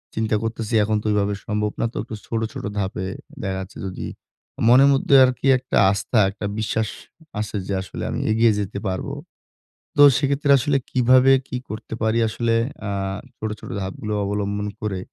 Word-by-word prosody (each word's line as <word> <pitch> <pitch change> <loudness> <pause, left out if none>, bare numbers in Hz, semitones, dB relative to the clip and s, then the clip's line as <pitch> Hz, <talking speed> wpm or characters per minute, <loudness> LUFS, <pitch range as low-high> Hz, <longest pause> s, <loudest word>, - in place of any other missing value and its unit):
চিন্তা 110 -1 0
করতেছি 115 0 -4
এখন 110 +1 +1
তো - - -17
ওইভাবে 105 0 +1
সম্ভব 105 -1 -1
না। - - +2
তো - - -6
কিছু 110 -3 -7
ছোট, 115 - -1
ছোট - - -7
ধাপে 95 -2 -2 0.4
দেখা 95 -1 -2
যাচ্ছে 95 +1 -8
যদি 95 - -5 0.6
মনের 130 +3 +7
মধ্যে 135 +1 +3
আরকি 130 +1 -2
একটা 130 +1 -2
আস্থা, 100 +3 0
একটা 100 +1 -7
বিশ্বাস 110 0 -1 0.5
আছে 105 0 -4
যে 100 - -2
আসলে 95 - -7
আমি - - -3
এগিয়ে 115 +1 +4
যেতে 100 0 -3
পারবো। 95 +9 -3 0.8
তো - - +4 0.2
সেক্ষেত্রে 140 0 0
আসলে 140 +1 +1
কিভাবে 130 +1 +5 0.2
কি 125 - -4
করতে 110 +1 -7
পারি 110 +1 +1
আসলে 115 +1 -1 0.3
আ - - -2 0.5
ছোট, 110 - -3
ছোট - - -10
ধাপগুলো 95 +3 -4
অবলম্বন 100 0 -2
করে, 100 -3 -2
110 Hz, 170 wpm, -22 LUFS, 100-125 Hz, 0.8 s, মনের